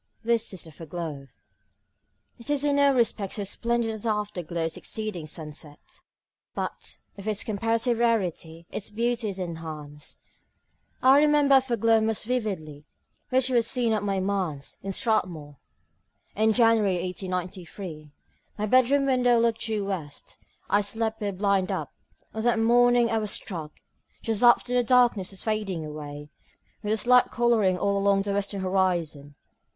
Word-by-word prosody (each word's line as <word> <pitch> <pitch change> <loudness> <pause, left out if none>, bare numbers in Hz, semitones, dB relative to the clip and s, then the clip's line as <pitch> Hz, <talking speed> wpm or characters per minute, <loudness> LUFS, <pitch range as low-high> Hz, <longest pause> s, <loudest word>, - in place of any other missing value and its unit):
This 230 0 +1
is 190 - -6
the 160 - -13
foreglow. 155 -3 -7 1.1
It 235 - -9
is 290 -1 +1
in 285 -1 +2
no 280 0 +5
respect 225 -6 0
so 205 - -2
splendid 235 +3 -1
as 220 -1 -7
the 230 - -1
afterglow 180 -6 -2
succeeding 185 -1 -5
sunset; 150 -1 -10 0.6
but, - - -5 0.2
because - - -14
of - - -9
its 210 -1 -1
comparative 225 +3 0
rarity, 180 -8 -1
its 205 - -6
beauty 235 +1 -1
is 195 - -5
enhanced. 155 -4 -7 0.8
I 265 +2 +7
remember 295 -2 +5
a - - +4
foreglow 230 -3 +2
most 220 -1 -1
vividly 190 -12 -3 0.4
which 260 0 +2
was 235 -3 +2
seen 235 -2 0
at 215 - 0
my 195 -1 -1
manse, 185 -8 -2
in 195 - -4
Strathmore, 180 - -1 0.8
in 220 +1 +3
January 225 -4 +4
1893. 180 -3 -6 0.5
My 210 - -1
bedroom 255 +5 +4
window 250 -2 +3
looked 230 -1 +1
due 215 -3 -1
west; 165 -8 -6 0.3
I 205 - +3
slept 220 +2 -3
with 205 - -1
the - - -15
blind 200 -2 +1
up. - - -4 0.4
On 220 - -3
that 240 0 +2
morning 240 +1 +4
I 225 - +2
was 210 -1 -3
struck, 165 -7 -4 0.5
just 225 -1 -1
after 240 0 +5
the 245 0 +3
darkness 240 -6 +3
was 195 - -10
fading 205 -7 -2
away, 150 -1 -8 0.5
with 210 - -2
a - - +1
slight 250 +2 +4
colouring 225 -6 +2
all 200 +2 0
along 200 0 +2
the 200 0 -2
western 200 0 -2
horizon. 175 -7 -1
205 Hz, 155 wpm, -26 LUFS, 180-235 Hz, 1.1 s, I